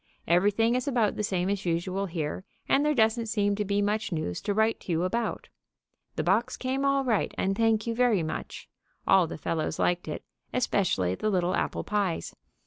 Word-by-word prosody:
Everything 205 +6 +3
is 255 +3 -1
about 235 -6 +1
the - - -2
same 185 -3 0
as 200 0 -1
usual 185 +3 -1
here, 165 0 -3 0.2
and 280 - +3
there 300 0 +2
doesn't 225 0 +2
seem 205 -2 +1
to 210 - -1
be 205 0 0
much 210 +1 -1
news 155 - -3
to - - -2
write 220 +1 +2
to - - -6
you 165 +1 +1
about. 230 +4 -2 0.7
The - - -1
box 225 +8 +1
came 260 +2 -2
all 275 0 +2
right, 225 -5 +1
and 195 +1 0
thank 225 0 +2
you 230 - -1
very 230 -6 +2
much. 155 - -5 0.4
All 190 -3 +5
the - - -6
fellows 160 0 -2
liked 175 -1 0
it, 150 - -5 0.3
especially 185 - +1
the 215 - -1
little 180 -2 +1
apple - - -1
pies. 200 -5 -1
205 Hz, 195 wpm, -28 LUFS, 180-230 Hz, 0.7 s, All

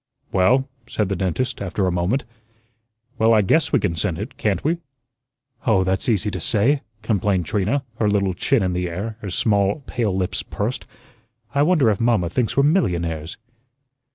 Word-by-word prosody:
"Well," 125 +9 +3 0.2
said 105 -5 -1
the 100 - 0
dentist, 95 +7 -2
after 95 0 -1
a 90 - +1
moment, 90 +10 0 0.9
"well, 115 0 +5
I 105 - +4
guess 160 - +2
we - - +4
can 95 -5 0
send 80 +1 -2
it, 105 +8 -6
can't 105 -3 -1
we?" 165 +4 +1 0.9
"Oh, 100 -5 +4
that's 95 +7 0
easy 105 -1 +1
to 90 - -4
say," 120 - +2 0.2
complained 100 -4 +1
Trina, 105 - 0 0.2
her 105 - +2
little 100 -2 +1
chin 115 +5 +1
in 90 -1 0
the 90 0 -1
air, 105 +6 -5
her 100 - -5
small 100 - +1
pale 105 -6 -1
lips 90 -1 -1
pursed. - - -4 0.7
"I 140 - +2
wonder 150 -7 +4
if 100 - -2
mamma 110 -8 +2
thinks 125 +3 -1
we're 140 - +5
millionaires?" 85 - 0
105 Hz, 175 wpm, -22 LUFS, 90-120 Hz, 0.9 s, well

